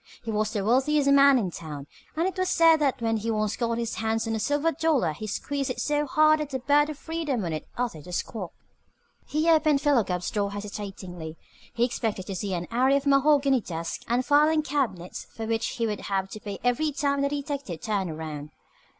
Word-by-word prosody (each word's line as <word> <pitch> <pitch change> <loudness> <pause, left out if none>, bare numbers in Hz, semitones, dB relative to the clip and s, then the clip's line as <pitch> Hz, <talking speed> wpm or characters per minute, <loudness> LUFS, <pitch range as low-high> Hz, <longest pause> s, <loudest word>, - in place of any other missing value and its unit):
He 230 - -3
was 215 0 0
the 200 -3 -2
wealthiest 275 +5 +3
man 280 -1 +7
in 195 -7 -1
town, 150 -4 -7 0.3
and 330 +2 +1
it 380 - -3
was 370 -1 0
said 330 -2 +6
that 270 -5 0
when 225 0 +1
he 220 +2 -3
once 215 -1 0
got 230 -1 -1
his 235 -1 -2
hands 225 0 -1
on 225 - -1
a 220 - -1
silver 290 +8 +1
dollar 300 - +1
he 215 +8 -7
squeezed 275 +6 -2
it 255 - -3
so 295 0 0
hard 310 +2 +4
that 300 -2 -3
the 270 - -2
bird 290 +3 +3
of 305 - -6
freedom 310 - -2
on 165 - -2
it 155 - -5
uttered 215 -12 -3
a - - -8
squawk. 185 0 -4 0.8
He 310 +2 0
opened 310 -3 +4
Philo 280 -5 +3
Gubb's 180 -2 -3
door 200 -2 -1
hesitatingly. 190 -5 -7 0.3
He 235 - +1
expected 220 -6 -3
to 195 - -5
see 190 +1 -2
an 175 0 -4
array 260 +4 +3
of 280 - -4
mahogany 275 -2 +4
desks 165 -3 -5
and 245 +2 +1
filing 300 +2 +4
cabinets 255 - -2
for 225 - -4
which 225 0 0
he 230 - 0
would 210 -2 -2
have 195 -1 -2
to 215 - -7
pay 205 -3 -6
every 245 +5 +1
time 280 0 0
the 280 - +1
detective 280 - -4
turned 200 -4 -1
around. 155 -2 -6
240 Hz, 215 wpm, -26 LUFS, 200-290 Hz, 0.8 s, man